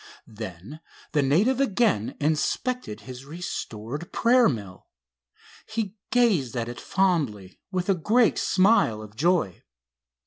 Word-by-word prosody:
Then 110 - -9 0.3
the 150 - +2
native 195 - +2
again 215 - +1
inspected 155 - -1
his 130 0 -9
restored 145 -3 -6
prayer 240 -1 +4
mill. 100 -6 -6 0.8
He 220 -3 -3 0.2
gazed 190 - +2
at 115 -1 -2
it 120 0 -7
fondly, 145 - 0
with 180 -1 -2
a 195 - +4
great 215 +7 +2
smile 185 - +3
of 105 0 -13
joy. 160 - +1
155 Hz, 115 wpm, -25 LUFS, -, 0.8 s, prayer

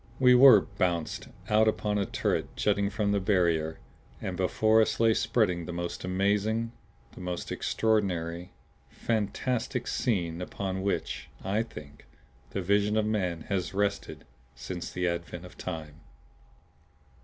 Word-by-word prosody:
We 125 -1 +7
were 125 -4 +9 0.2
BOUNCED 85 -3 -1 0.2
out 110 +1 +4
upon 105 -1 0
a 100 - -1
turret - - -1
jutting 100 -1 +1
from 100 0 0
the 100 - +2
barrier. 85 -5 +1 0.4
And - - -4
before 110 0 +3
us 110 0 0
lay 115 -1 +5
spread 110 -1 +2 0.2
the - - -4
most 85 0 -4
amazing, 105 +5 0 0.4
the - - -11
most 90 -1 -4
extraordinary 90 -6 0 0.4
fantastic 115 +3 -2
scene 90 -8 -1
upon 95 +1 -3
which, 100 0 -2
I 100 +3 +1
think, 75 -11 -10 0.4
the 100 - -3
vision 100 +3 +2
of 110 - +2
man 90 -6 -1
has 95 0 -3
rested 100 0 -2 0.3
since 85 +8 -6
the 90 0 -1
advent 85 +1 -4
of 90 - -13
time. 80 -4 -7
100 Hz, 135 wpm, -29 LUFS, 90-110 Hz, 0.4 s, were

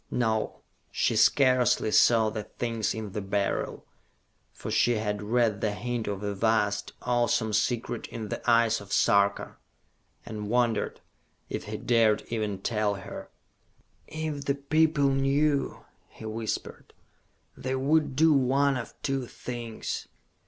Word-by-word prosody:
No, 110 -3 -1 0.3
she - - 0
scarcely 125 0 +4
saw 110 -1 +5
the 110 0 -3
things 115 -3 -2
in 110 -2 -5
the 105 +1 -3
Beryl, 100 0 -2 0.7
for - - -7
she 120 - +3
had 105 -2 -2
read 110 -1 +1
the 105 -2 0
hint 120 0 -3
of 100 0 -3
a 100 0 -2
vast, 105 0 0
awesome 120 -3 +1
secret 120 +2 -1
in 110 -2 -6
the - - -4
eyes 115 -1 +4
of 100 -1 -12
Sarka 100 0 +2 0.7
and 105 -1 -6
wondered 120 -2 0 0.5
if - - -4
he - - -5
dared 115 -3 +2
even 105 -4 -3
tell 105 -3 0
her. 95 - -8 0.8
"If 155 -3 -4
the 140 - +1
people 150 0 +2
knew," 140 +2 +1 0.2
he 110 - -12
whispered, 110 0 -5 0.6
"they 130 +1 -3
would 145 +1 +1
do 160 +2 +5
one 135 0 +2
of 120 - -8
two 135 -3 -1
things! 120 -3 -6
115 Hz, 135 wpm, -27 LUFS, 105-130 Hz, 0.8 s, saw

